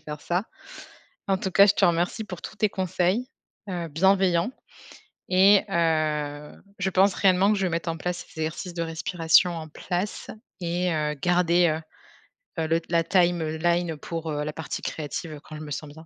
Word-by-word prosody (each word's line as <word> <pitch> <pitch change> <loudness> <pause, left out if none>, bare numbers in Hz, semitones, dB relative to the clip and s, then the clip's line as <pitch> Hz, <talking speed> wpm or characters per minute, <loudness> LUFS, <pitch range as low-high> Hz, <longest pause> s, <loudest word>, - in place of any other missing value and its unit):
faire 150 -1 -8
ça. 175 +6 -1 0.8
En 195 -1 +2
tout 190 - -3
cas, 200 +2 +7
je 200 - +5
te - - +2
remercie 175 +6 0
pour 180 -4 -8
tous - - -8
tes 215 0 +2
conseils, 190 +6 -1 0.4
heu, 175 -2 -3
bienveillants 185 - +2 0.8
et 195 +2 +6
heu, 155 -4 0 0.3
je 190 0 0
pense 190 +1 +4
réellement 190 +1 +4
que 210 - 0
je 195 - 0
vais - - -1
mettre 170 +1 -2
en 165 - -2
place 175 +1 -4
ces 160 - -9
exercices 160 +3 -4
de 170 - -2
respiration 165 +1 +2
en 160 -1 -7
place 180 +5 -4 0.3
et, 175 +1 -1
heu, 150 -1 -1
garder, 175 +3 +3
heu 155 0 -1 0.8
heu - - -1
le 165 +1 +1
la 170 -1 +2
timeline 170 -1 +1
pour, 165 +2 -5
heu, 150 0 -2
la 150 - -3
partie 160 -1 -5
créative 155 0 -5
quand 155 - -10
je - - -8
me 150 -1 -8
sens 145 +1 -5
bien. 160 +2 -13
170 Hz, 185 wpm, -25 LUFS, 160-185 Hz, 0.8 s, cas